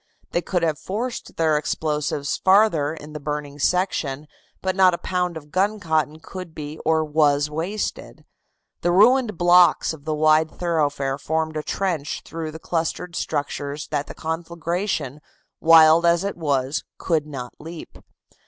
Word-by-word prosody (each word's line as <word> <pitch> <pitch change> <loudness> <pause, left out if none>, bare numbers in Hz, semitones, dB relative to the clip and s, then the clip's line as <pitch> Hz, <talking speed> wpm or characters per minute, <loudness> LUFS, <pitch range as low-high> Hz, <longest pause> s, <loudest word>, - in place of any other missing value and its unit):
They 175 - 0
could 175 -1 -1
have 155 -3 0
forced 230 +6 -4
their 155 -2 +3
explosives 150 -2 -2
farther 185 -7 +4
in 150 -1 -11
the 150 - -5
burning 145 0 -5
section, 155 -5 0 0.3
but 185 -1 -2
not 185 -2 +5
a - - -7
pound 180 -2 -2
of 150 -1 -12
guncotton 165 -5 0
could 180 -3 -9
be 150 +1 -7
or 160 0 +2
was 150 -1 +2
wasted. 175 +8 -4 0.6
The 175 - +1
ruined 215 +2 +4
blocks 175 -1 +5
of 150 -3 -12
the 155 -1 -1
wide 155 +1 +4
thoroughfare 145 -6 -1
formed 160 +2 -2
a 155 - -1
trench 165 -3 -2
through 165 -1 -5
the 155 - -8
clustered 170 +1 -3
structures 145 0 -3
that 145 -1 -2
the - - -9
conflagration, 165 -2 -3 0.4
wild 160 0 +7
as 170 +1 +3
it 200 - -3
was, 140 -3 -1
could 155 -4 0
not 125 -4 -7
leap. 165 +1 -10
160 Hz, 150 wpm, -23 LUFS, 150-175 Hz, 0.6 s, wild